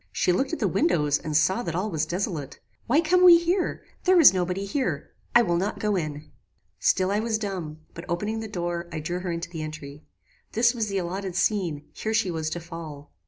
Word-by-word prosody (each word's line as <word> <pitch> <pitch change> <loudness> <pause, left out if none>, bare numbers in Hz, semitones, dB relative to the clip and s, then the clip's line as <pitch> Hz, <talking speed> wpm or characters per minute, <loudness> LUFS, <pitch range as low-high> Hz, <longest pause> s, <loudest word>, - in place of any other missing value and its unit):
She 180 - +1
looked 265 +9 0
at 330 - -2
the - - +1
windows 150 - +2
and 155 -1 0
saw 190 +9 +2
that 170 -7 -4
all 200 +4 -1
was 155 -1 -1
desolate 170 -6 -3 0.3
"Why 285 +7 +4
come 360 +3 +3
we 350 -2 +10
here? 350 +2 -1 0.2
There 370 -1 +6
is 310 - +9
no 185 -1 +1
body 185 +3 -3
here. 260 +7 -2 0.2
I 240 - +8
will 175 -5 +1
not 195 +4 -1
go 210 -1 0
in." 155 -3 -4 0.5
"Still 185 0 +2
I 205 - +1
was 220 0 0
dumb; 180 -7 -5
but 170 - -9
opening 210 +6 -2
the 220 - -5
door, 175 -3 -3
I - - -4
drew 175 +4 -3
her 180 -1 -3
into 170 0 -4
the 160 -3 -5
entry. 155 -1 -8 0.5
This 235 +2 +3
was 225 -3 -2
the 195 -1 -2
allotted 185 +1 -3
scene: 180 -7 0
here 220 0 -2
she 210 -4 +1
was 160 -1 -2
to 175 - -4
fall. 160 -4 -9
180 Hz, 220 wpm, -26 LUFS, 160-220 Hz, 0.5 s, we